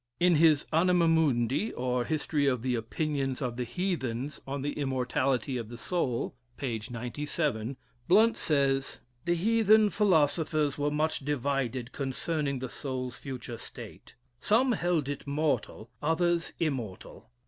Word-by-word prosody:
In 175 -2 +5
his 155 -2 +5
"Anima 175 +1 +4
Mundi, 150 - +2
or, 125 -1 -1
History 150 -2 0
of 125 -4 +1
the 130 -1 0
Opinions 135 +3 -2
of 125 -4 -2
the 125 - -2
Heathens 140 -6 -3
on 135 0 -3
the 145 - -1
Immortality 130 -1 0
of 115 -2 -6
the 120 - -8
Soul," 130 -6 -1 0.2
(p. 120 -6 -2
97,) 125 0 -2 0.3
Blount 220 +5 +5
says: 135 -3 +1 0.3
"The 175 - +2
heathen 215 +2 +4
philosophers 155 -6 +2
were 145 0 0
much 155 +2 0
divided 135 -3 -1
concerning 140 +1 -2
the 130 0 -5
soul's 130 -3 -4
future 125 -4 -6
state; - - -10 0.2
some 245 - +3
held 175 - +1
it 145 0 -5
mortal, 140 -6 -1
others 170 +2 +1
immortal. 130 - -4
140 Hz, 135 wpm, -29 LUFS, 125-165 Hz, 0.3 s, In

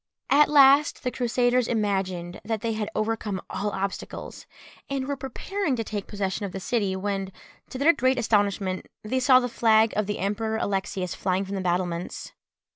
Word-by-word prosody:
At 295 +1 +6
last 285 0 +5
the 250 - -1
Crusaders 245 0 +1
imagined 190 -5 -2
that 220 0 -2
they 230 0 -1
had 215 -1 -3
overcome 215 -3 -1
all 200 +2 -2
obstacles, 195 0 -5 0.4
and 270 -1 -2
were 285 - -1
preparing 275 - -3
to 230 - -2
take 205 -2 -5
possession 205 0 -3
of 195 -3 -4
the 195 - -4
city, 200 -2 -1
when, 195 0 -3 0.4
to 260 - -6
their 300 +5 +5
great 260 -1 +1
astonishment, 200 -5 0 0.2
they 255 +5 -1
saw 255 0 +6
the 245 - -1
flag 225 -2 +3
of 210 -2 0
the 205 - -2
Emperor 220 +3 -1
Alexius 195 -3 -2
flying 185 +1 -1
from 195 - -6
the 195 - -2
battlements. 175 -1 -2
215 Hz, 175 wpm, -26 LUFS, 195-250 Hz, 0.4 s, At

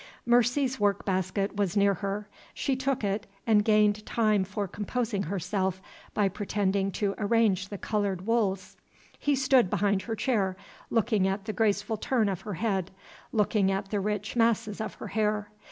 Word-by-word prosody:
Mercy's 245 +2 +2
work 205 -1 +1
basket 190 +1 -1
was 200 -1 0
near 200 0 +4
her. 200 +1 -4 0.3
She 270 - 0
took 260 -2 -1
it, 200 +1 -1 0.2
and 215 -2 +4
gained 210 -1 +3
time 215 -4 +2
for 200 +1 -3
composing 215 +1 -2
herself 190 +1 -1 0.4
by 205 -2 +3
pretending 195 0 0
to 200 -2 0
arrange 205 -3 +2
the 205 - -5
colored 200 -3 -2
wools. 205 -5 0 0.4
He 290 -1 +2
stood 260 -6 +4
behind 200 0 +1
her 225 +2 -4
chair, 205 -5 0 0.3
looking 215 -4 +2
at 195 +1 -2
the 215 - -3
graceful 210 0 +1
turn 225 -1 +1
of 190 -2 -3
her 205 -1 -5
head, 190 -2 -1 0.4
looking 210 -3 +2
at 195 0 -3
the 205 - +1
rich 210 +2 -2
masses 225 -2 +1
of 220 - -4
her - - -8
hair. 210 -1 0
205 Hz, 165 wpm, -28 LUFS, 195-225 Hz, 0.4 s, near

